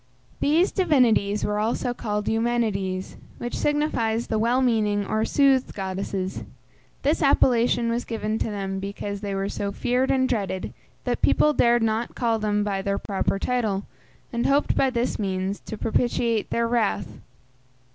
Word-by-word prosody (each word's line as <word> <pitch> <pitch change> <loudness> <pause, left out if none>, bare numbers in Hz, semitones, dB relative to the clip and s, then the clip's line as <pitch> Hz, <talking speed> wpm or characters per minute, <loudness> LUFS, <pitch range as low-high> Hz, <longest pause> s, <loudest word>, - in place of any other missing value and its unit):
These 325 +6 +3
divinities 245 - +2
were 210 0 0
also 235 +3 -1
called 210 -3 -3
Eumenides, 220 -5 -1 0.2
which 240 - -4
signifies 240 -7 0
the 220 - -1
"well 235 +3 +2
meaning" 215 -5 +1
or 215 +2 0
"soothed 270 -1 +2
goddesses;" 190 -1 -3 0.6
This 295 +5 +1
appellation 240 -4 +3
was 235 +1 -1
given 220 -1 -3
to - - -1
them 195 -2 -3
because 200 +1 -5
they 200 -2 -3
were 195 0 -1
so 200 0 -3
feared 250 +5 0
and 260 -1 +3
dreaded 195 -6 -2 0.3
that - - -2
people 300 - +4
dared 240 -3 +3
not 225 +1 -1
call 230 -2 +1
them 210 -1 0
by 200 -2 -1
their 200 0 -1
proper 195 -1 -1
title, 215 -4 -1 0.5
and 235 0 0
hoped 280 +2 +2
by 270 - +3
this 245 -1 -1
means 190 0 -2
to 220 - -8
propitiate 230 0 0
their 235 0 0
wrath. 230 -4 -1
225 Hz, 155 wpm, -24 LUFS, 200-245 Hz, 0.6 s, people